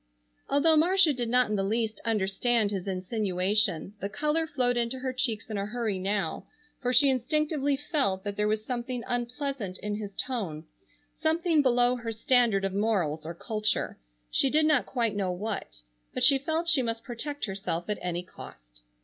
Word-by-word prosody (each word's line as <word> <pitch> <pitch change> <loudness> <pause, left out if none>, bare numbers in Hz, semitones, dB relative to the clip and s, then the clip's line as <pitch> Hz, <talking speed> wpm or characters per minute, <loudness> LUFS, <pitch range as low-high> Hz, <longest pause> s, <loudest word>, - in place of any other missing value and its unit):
Although 310 +3 +4
Marcia 345 0 +5
did 240 -3 -2
not 250 +1 +4
in - - +1
the 195 - 0
least 220 +1 -1
understand 215 +1 +1
his 195 -2 -4
insinuation, 190 -1 0
the 200 - -2
color 300 +8 0
flowed 250 -4 +1
into 240 +2 -1
her 260 0 -3
cheeks 245 -5 -1
in 215 -3 -3
a 200 - -2
hurry 215 -3 -2
now, 200 +1 -2 0.3
for 250 -2 -1
she 280 +3 +6
instinctively 285 +2 +1
felt 265 - 0
that 205 -1 -4
there 210 +1 +1
was 215 0 -1
something 245 0 -3
unpleasant 245 -4 -3
in 210 0 -3
his 205 -2 -7
tone, 195 -12 -3 0.5
something 320 0 +2
below 245 -1 +3
her 235 -1 -4
standard 225 -4 +2
of 195 - -2
morals 180 -8 0
or 170 - -5
culture, 215 +3 -1 0.3
she 270 - +3
did 310 +3 +3
not 305 -5 +3
quite 230 -5 0
know 195 -2 0
what. 190 - -4 0.4
But 255 - 0
she 270 +1 +6
felt 320 +4 -1
she 305 -5 +4
must 230 -1 -3
protect 285 +5 -4
herself 190 -4 -3
at 210 -1 -2
any 175 0 -2
cost. - - -13
230 Hz, 175 wpm, -28 LUFS, 200-265 Hz, 0.5 s, she